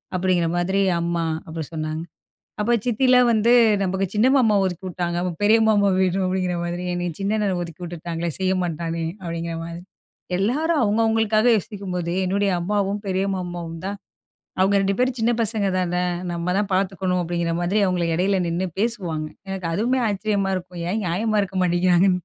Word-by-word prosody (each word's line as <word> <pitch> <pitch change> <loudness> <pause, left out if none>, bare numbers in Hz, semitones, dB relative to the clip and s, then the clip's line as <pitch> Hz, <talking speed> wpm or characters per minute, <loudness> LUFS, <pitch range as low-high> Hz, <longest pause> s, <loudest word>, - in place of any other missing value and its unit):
அப்படிங்கிற 180 -2 +1
மாதிரி 190 +3 +1 0.2
அம்மா, 170 -1 -1 0.2
அப்படி 160 -1 -5
சொன்னாங்க. 155 +1 -3 0.6
அப்போ 235 +3 +1
சித்திலாம் 250 +1 +4
வந்து 225 +2 +3 0.3
"நமக்கு 190 +1 0
சின்ன 215 +4 +3
மாமா 225 -6 +4
ஒதுக்கிவுட்டாங்க, 175 -1 -3
அப்ப 180 -1 -1
பெரிய 215 +2 +5
மாமா 205 -2 +4
வேணும்" 190 0 +1
அப்படிங்கிற 185 -1 -1
மாதிரி. 175 +1 -3
"என்னய 175 -1 -2
சின்ன 200 +2 0
அண்ணன 200 -3 0
ஒதுக்கி 170 0 -9
விட்டுட்டாங்களே 170 0 -4
செய்ய 190 0 +1
மாட்டானே!" 165 0 -3 0.2
அப்படிங்கிற 170 -1 -4
மாதிரி. 170 +1 -7 0.6
எல்லாரும் 290 - +1
அவங்கவங்களுக்காக 220 +1 +2
யோசிக்கும்போது 185 -5 -4
என்னுடைய 200 +2 +1
அம்மாவும், 200 +2 -1
பெரிய 190 0 0
மாமாவும் 175 -2 -5
தான் 200 +1 -4 0.6
"அவங்க 195 +2 +3
2 195 0 +1
பேரும் 255 0 +1
சின்ன 230 +2 +2
பசங்க 215 -2 0
தானே, 180 0 0 0.3
நம்ம 170 +1 -1
தான் 205 - -1
பார்த்துக்கணும்." 185 -1 0
அப்படிங்கிற 170 0 -1
மாதிரி. 190 +5 +1
அவுங்கள 175 -2 0
இடையில 190 +2 +1
நின்னு 175 +3 -1
பேசுவாங்க. 180 -9 -1 0.2
எனக்கு 190 -3 -3
அதுவுமே 245 +7 +1
ஆச்சரியமா 200 -1 0
இருக்கும். 180 -1 -8
ஏன் 210 +4 -1
நியாயமா 210 +5 0
இருக்க 190 -1 -5
மாட்டேங்கிறாங்கன்னு? 180 +1 +3
185 Hz, 155 wpm, -23 LUFS, 175-205 Hz, 0.6 s, பெரிய